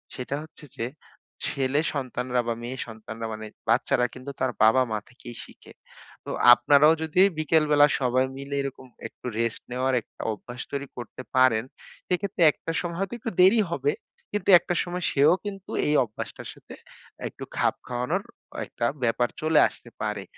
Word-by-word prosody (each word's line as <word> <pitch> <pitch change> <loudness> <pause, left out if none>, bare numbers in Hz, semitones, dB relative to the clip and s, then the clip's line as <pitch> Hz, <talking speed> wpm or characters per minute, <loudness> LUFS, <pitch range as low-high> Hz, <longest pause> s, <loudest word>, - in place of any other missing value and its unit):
সেটা 130 +2 -4
হচ্ছে 155 -1 -14
যে, 115 - -1 0.6
ছেলে 135 +2 0
সন্তানরা 125 -2 -1
বা 115 - +1
মেয়ে 125 +2 -5
সন্তানরা 110 0 -7
মানে, 110 0 -7 0.2
বাচ্চারা 125 +1 +3
কিন্তু 130 +2 -7
তার 130 -1 +1
বাবা-মা 110 0 +4
থেকেই 120 -1 -11
শিখে। - - -15 0.5
তো - - -5 0.2
আপনারাও 145 +6 +5
যদি 160 +4 +2 0.2
বিকেলবেলা, 150 -2 +4
সবাই 130 0 +2
মিলে 140 +1 -5
এরকম 135 -1 -6 0.2
একটু - - -20
রেস্ট 115 -1 -1
নেওয়ার 130 +1 0
একটা - - -14
অভ্যাস 120 +5 -9
তৈরি 140 -1 -3
করতে 120 +1 -7
পারেন, 130 -4 +4 0.4
সেক্ষেত্রে 185 +1 -2
একটা 165 - -6
সময় 170 -1 -4
হয়তো 195 +1 -2
একটু 225 - -4
দেরি 205 +5 +6
হবে, 140 -1 +1 0.4
কিন্তু 205 -1 -2
একটা 175 - -3
সময় 180 0 -4
সেও 150 +4 +5
কিন্তু 195 -1 -7 0.2
এই 150 - +2
অভ্যাসটার 110 -3 -7
সাথে - - -14 0.5
একটু - - -9
খাপ - - +2
খাওয়ানোর 125 0 -1 0.4
একটা 120 - -3 0.2
ব্যাপার 120 +1 +2
চলে 155 0 +4
আসতে 120 - -12
পারে। 105 -2 -2
130 Hz, 155 wpm, -26 LUFS, 120-155 Hz, 0.6 s, দেরি